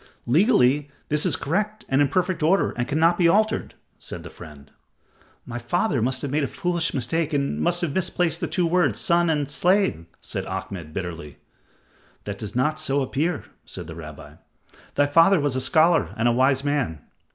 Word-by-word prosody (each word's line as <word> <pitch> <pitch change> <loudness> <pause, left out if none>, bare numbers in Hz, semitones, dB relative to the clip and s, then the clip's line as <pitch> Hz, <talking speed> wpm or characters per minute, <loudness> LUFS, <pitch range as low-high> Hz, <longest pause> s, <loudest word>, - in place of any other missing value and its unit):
"Legally, 145 - +3 0.2
this 150 0 +3
is - - +2
correct 210 +8 -2
and 135 +2 +2
in 145 - +4
perfect 180 +3 -1
order 175 +6 +2
and 120 0 -3
cannot 165 +4 +2
be 175 - +5
altered," 215 +5 +1 0.2
said - - -8
the - - -10
friend. 75 -2 -13 0.7
"My 120 0 -6
father 135 - 0
must 130 +4 0
have 140 - -3
made 150 +1 +1
a - - 0
foolish 175 -2 -1
mistake 150 +5 -1
and 140 -1 -1
must 175 0 +1
have 165 -5 -2
misplaced 175 -2 0
the - - -1
two 180 - 0
words 175 +1 +1
'son' 170 0 +3
and 150 -3 0
'slave,'" 175 - +1
said - - -5
Ahmed, 85 -5 -6
bitterly. 85 -4 -6 0.9
"That 100 -1 -6
does 105 0 -6
not 150 +5 +1
so 140 0 +1
appear," 150 +7 -2 0.2
said - - -8
the 80 - -8
rabbi; 75 -3 -11 0.6
"thy 145 - +3
father 165 +6 +5
was 145 -3 -1
a 130 - 0
scholar 160 +3 +3
and 120 +1 +2
wise 130 +1 +2
man. 140 - -1
145 Hz, 180 wpm, -23 LUFS, 125-175 Hz, 0.9 s, be